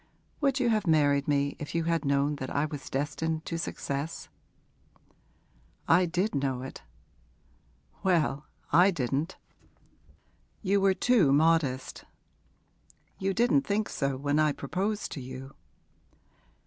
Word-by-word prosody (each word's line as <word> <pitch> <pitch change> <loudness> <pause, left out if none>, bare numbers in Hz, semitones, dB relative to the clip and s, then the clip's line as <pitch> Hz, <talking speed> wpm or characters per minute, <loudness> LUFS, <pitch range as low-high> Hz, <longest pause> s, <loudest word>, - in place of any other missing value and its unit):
Would 275 -2 +1
you 245 -2 +2
have 215 -3 +1
married 145 -3 +3
me 140 -1 +1
if 150 +1 -6
you 165 - +1
had 165 -2 0
known 140 +1 +1
that 130 -1 -5
I 145 +1 0
was 145 -2 -7
destined 160 +3 -2
to 165 - -3
success?' 145 -1 -4 1.6
'I 175 +2 +5
did 180 +5 -1
know 135 -3 -1
it.' 130 - -8 1.2
'Well, 155 -6 +1 0.2
I 175 +5 +6
didn't' 145 +1 -2 1.3
'You 200 0 +2
were 195 -1 +3
too 220 - +3
modest.' 145 -3 +1 1.2
'You 195 0 0
didn't 245 +4 +3
think 210 -4 -1
so 140 -2 -1
when 145 +2 0
I 155 -1 +3
proposed 195 +10 -3
to 140 - -5
you.' 130 +1 -8
155 Hz, 125 wpm, -28 LUFS, 140-190 Hz, 1.6 s, I